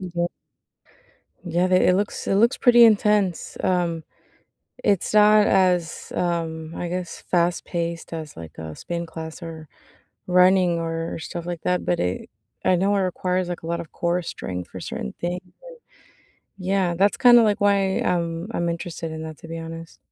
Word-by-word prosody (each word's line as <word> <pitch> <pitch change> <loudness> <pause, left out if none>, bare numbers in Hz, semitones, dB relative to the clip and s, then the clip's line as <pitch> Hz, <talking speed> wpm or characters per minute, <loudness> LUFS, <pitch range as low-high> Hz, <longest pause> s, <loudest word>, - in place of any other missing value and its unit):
Yep. 175 -2 -2 1.2
Yeah, 175 +2 +1
th 185 0 +4
it 180 - +4
looks 205 +1 -2
it 195 - +2
looks 235 +4 +4
pretty 240 -2 +7
intense. 210 -4 +2
Um, 170 -3 0 0.8
it's 200 -1 +1
not 210 0 +6
as, 180 -3 +1
um, 165 -2 -2
I 175 - -3
guess, 180 0 -5
fast 175 -1 +1
paced 170 -1 -4
as, 155 - -6
like, 80 -2 -10
a 80 -1 -7
spin 170 0 -4
class 160 +1 -8
or 160 -2 -8 0.6
running 180 -1 +4
or 165 0 -3
stuff 170 +1 -6
like 175 -2 -4
that, 180 0 0
but 175 - 0
it 90 +1 -2 0.4
I 185 - +4
know 195 +3 +2
it 195 - +2
requires, 185 0 -1
like, 175 - -5
a - - -6
lot 170 0 -1
of 160 - -12
core 175 +1 -1
strength 90 - -6
for - - -8
certain 65 - -5
things 175 +1 -3 1.2
Yeah 185 -1 0
that's 200 +3 +2
kinda, 240 -2 +7
like, 210 -2 +2
why 200 -1 +2
I'm 170 +1 -1
I'm 170 0 0
interested 170 -1 -5
in 160 0 -6
that, 155 -1 -8
to 165 - -12
be 165 0 -6
honest. 165 0 -9
175 Hz, 170 wpm, -23 LUFS, 165-185 Hz, 1.2 s, pretty